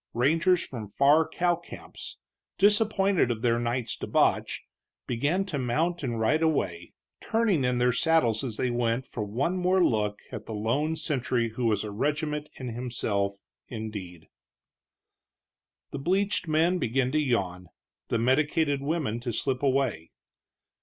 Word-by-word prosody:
Rangers 165 +8 +3
from 115 -5 -7
far 145 +9 +4
cow 175 +1 +1
camps, 175 - -10 0.4
disappointed 200 - +3
of 115 -2 -3
their 120 -1 +2
night's 120 0 -2
debauch, - - +1 0.4
began 145 +11 0
to 160 -7 -3
mount 160 +8 0
and 120 -5 -2
ride 145 +9 +2
away, 95 - -1 0.3
turning 220 -10 +1
in 125 0 +1
their 125 0 +3
saddles 135 -7 +2
as 115 -5 -4
they 125 - 0
went 120 +1 0
for 110 - -5
one 130 - -1
more 180 0 +3
look 105 -2 0
at 110 -4 -7
the 110 - -5
lone 135 +10 0
sentry 130 -6 -1
who 120 +2 -3
was 105 -3 +1
a 105 - -5
regiment 150 +6 -2
in 130 -2 -6
himself, 105 -5 -2 0.2
indeed. 105 -7 -7 1.7
The 140 - -4
bleached 190 +5 +1
men 165 +4 +2
began 125 0 0
to 155 - +2
yawn, 95 -10 -1 0.4
the - - 0
medicated 145 +4 +2
women 140 -6 -1
to 120 0 -3
slip 130 +3 -1
away. 130 - 0
130 Hz, 145 wpm, -27 LUFS, 115-160 Hz, 1.7 s, far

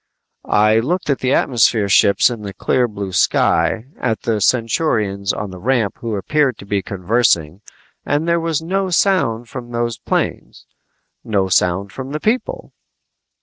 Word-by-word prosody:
I 110 +1 +4
looked 155 +6 -1
at 135 - -1
the 130 - 0
atmosphere 115 -5 +2
ships 100 +4 +4
in 115 -3 -6
the 100 -2 -7
clear 125 -1 +1
blue 100 -3 -6
sky, 90 +4 +2
at 115 -3 -1
the 110 -2 -1
Centaurians 110 -4 0
on 105 -2 -5
the 95 - -9
ramp 115 -3 0
who 115 -2 -3
appeared 135 +5 0
to - - -11
be 100 0 -1
conversing 95 -4 0 0.4
and 150 +3 -1
there 170 0 +2
was 165 -1 -2
no 190 +3 -1
sound 165 - +1
from 120 0 -8
those 120 -2 -2
planes, - - -3 0.6
no 100 -4 0
sound 95 +2 +1
from 135 +5 -7
the 150 - -2
people! 250 - -2
115 Hz, 155 wpm, -18 LUFS, 100-135 Hz, 0.6 s, I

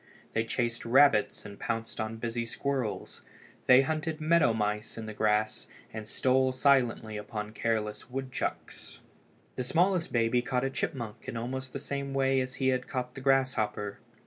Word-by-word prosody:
They 115 0 +1
chased 120 0 -1
rabbits 120 -2 +4
and 100 0 -9
pounced 115 0 -3
on 110 +1 -3
busy 115 +1 -2
squirrels. 125 -1 -3 0.5
They 130 +1 +8
hunted 155 +2 -2
meadow 160 -4 +4
mice 105 0 -2
in 115 - -5
the 110 - -6
grass, 105 0 +1 0.3
and 110 -1 -6
stole 130 +3 +2
silently 125 -5 +2
upon 105 0 -5
careless 110 0 -2
woodchucks. 130 0 -4 0.6
The 125 - -1
smallest 170 +6 +2
baby 120 +1 +2
caught 125 0 -1
a 135 - -1
chipmunk 130 -6 -4
in 115 - -4
almost 130 +3 -4
the - - -4
same 140 0 -4
way 135 -1 +3
as 130 0 -4
he 130 -1 +1
had 130 -1 0
caught 125 -1 -3
the 135 - -8
grasshopper. 125 -7 +1
125 Hz, 160 wpm, -30 LUFS, 110-135 Hz, 0.6 s, They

